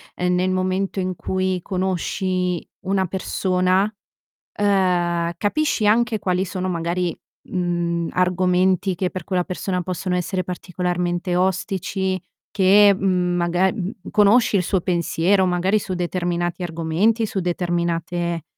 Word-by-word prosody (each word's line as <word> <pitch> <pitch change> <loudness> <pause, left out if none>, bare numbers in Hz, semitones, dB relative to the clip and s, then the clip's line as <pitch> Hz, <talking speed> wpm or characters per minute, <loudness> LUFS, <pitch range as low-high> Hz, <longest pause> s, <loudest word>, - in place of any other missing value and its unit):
ehm, 180 0 0
nel 185 +1 +1
momento 185 +1 -1
in 185 -1 -2
cui 185 0 -1
conosci 185 -1 -1 0.2
una 190 0 0
persona, 185 +2 +1 0.7
uhm, 180 -4 +2
capisci 215 - 0
anche 230 +1 +3
quali 185 -1 0
sono 185 0 -3
magari, 170 0 -1 0.3
mhmm, 175 -2 -1
argomenti 185 +1 +2
che 180 0 -1
per 185 - -6
quella 180 -2 0
persona 185 0 -3
possono 180 0 -2
essere 185 +1 -1
particolarmente 180 0 -2
ostici, 190 0 -1 0.3
che, 200 +1 +6
mhmm, 180 -2 0
magar 175 +3 +2
mhmm, 195 -2 -3 0.2
conosce 210 +1 +4
il 180 - +2
suo 190 0 +1
pensiero 180 +2 +1
magari 185 +4 +2
su 190 -2 -4
determinati 175 0 -2
argomenti, 175 +7 +1
su 195 - -3
determinate, 170 -1 -1
185 Hz, 125 wpm, -22 LUFS, 175-190 Hz, 0.7 s, che